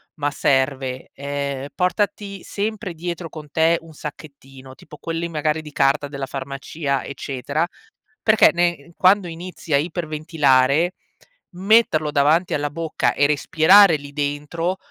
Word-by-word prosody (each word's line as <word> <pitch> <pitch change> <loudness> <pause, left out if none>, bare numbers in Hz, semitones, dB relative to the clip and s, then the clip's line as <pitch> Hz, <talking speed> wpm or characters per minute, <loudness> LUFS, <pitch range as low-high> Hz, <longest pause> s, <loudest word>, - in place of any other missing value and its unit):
ma 145 -1 -1
serve: 135 -2 0
ehm, 140 -1 -4
portati 200 +1 -1
sempre 210 -3 -4
dietro 170 0 -5
con 150 -2 -11
te 165 +2 +3
un 165 -1 -14
sacchettino 135 -3 -10
tipo 150 - -14
quelli, 165 +1 -4
magari, 155 0 -1
di 150 - -11
carta 140 +1 +2
della 140 -1 -5
farmacia, 140 +1 -4
eccetera. 140 +4 -3 0.6
Perché 215 0 +6
ne 175 0 +1
ehm, 140 +3 -19
quando 190 +2 +4
inizi 170 -1 -8
a 140 - +5
iperventilare, 155 -1 +1 0.6
metterlo 185 -5 +3
davanti 150 +5 +2
alla 145 0 -2
bocca 165 +1 -1
e 145 - +3
respirare 160 +5 +5
lì 145 0 -11
dentro, 150 +5 -2
155 Hz, 135 wpm, -21 LUFS, 140-175 Hz, 0.6 s, Perché